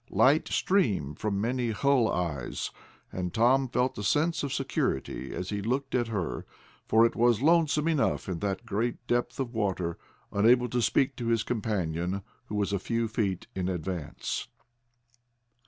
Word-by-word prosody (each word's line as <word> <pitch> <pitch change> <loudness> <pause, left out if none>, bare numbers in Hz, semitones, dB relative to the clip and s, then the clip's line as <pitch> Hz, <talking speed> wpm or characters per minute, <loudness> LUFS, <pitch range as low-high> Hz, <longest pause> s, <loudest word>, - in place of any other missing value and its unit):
Light 145 +4 +4
streamed 105 - +1
from 100 -2 -1
many 120 +2 0
bull's 135 0 +3
eyes, 80 -8 -2 0.4
and 90 -1 -3
Tom 130 +5 +3
felt 125 -1 0
a - - -3
sense 160 +10 +2
of 140 - -3
security 65 - -2
as 90 +2 -4
he 100 -1 -2
looked 130 +6 -1
at 120 -2 +1
her, 100 -7 -3 0.4
for 110 +1 +5
it 115 - 0
was 120 0 +3
lonesome 160 -1 +3
enough 155 -4 +1
in 90 -3 -3
that 95 -1 -2
great 115 +3 -2
depth 120 +2 -1
of 130 -2 -2
water, 95 -6 -1 0.3
unable 120 +4 +4
to 120 +2 0
speak 135 +3 +2
to 120 - -3
his 115 -1 +2
companion, 95 -5 -2 0.2
who 105 - -6
was 100 -1 0
a 100 - +1
few 115 +4 -1
feet 105 -5 -1
in 95 -1 -2
advance. 90 -3 -3
115 Hz, 160 wpm, -28 LUFS, 95-125 Hz, 0.4 s, for